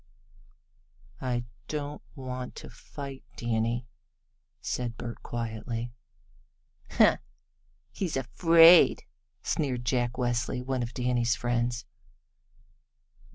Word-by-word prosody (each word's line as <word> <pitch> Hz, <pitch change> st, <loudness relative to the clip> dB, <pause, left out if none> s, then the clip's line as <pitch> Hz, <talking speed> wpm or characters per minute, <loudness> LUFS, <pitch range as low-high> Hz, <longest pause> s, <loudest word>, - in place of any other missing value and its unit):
"I 120 Hz, -2 st, -1 dB, 0.2 s
don't 150 Hz, -1 st, -4 dB
want 130 Hz, -1 st, -6 dB
to -, -, -9 dB
fight, 140 Hz, -2 st, -9 dB
Danny," 115 Hz, +1 st, 0 dB, 0.7 s
said 120 Hz, -2 st, -3 dB
Bert 120 Hz, -1 st, -6 dB
quietly. 115 Hz, 0 st, -4 dB, 1.0 s
"Huh! -, -, +5 dB, 0.7 s
he's 175 Hz, -8 st, -2 dB
afraid!" 165 Hz, +6 st, +7 dB, 0.4 s
sneered 130 Hz, -5 st, -1 dB
Jack 120 Hz, -2 st, +1 dB
Westly, 125 Hz, 0 st, -1 dB
one 130 Hz, -1 st, -1 dB
of 120 Hz, 0 st, -4 dB
Danny's 120 Hz, -2 st, +1 dB
friends. 120 Hz, 0 st, -1 dB
125 Hz, 85 wpm, -29 LUFS, 120-135 Hz, 1.0 s, afraid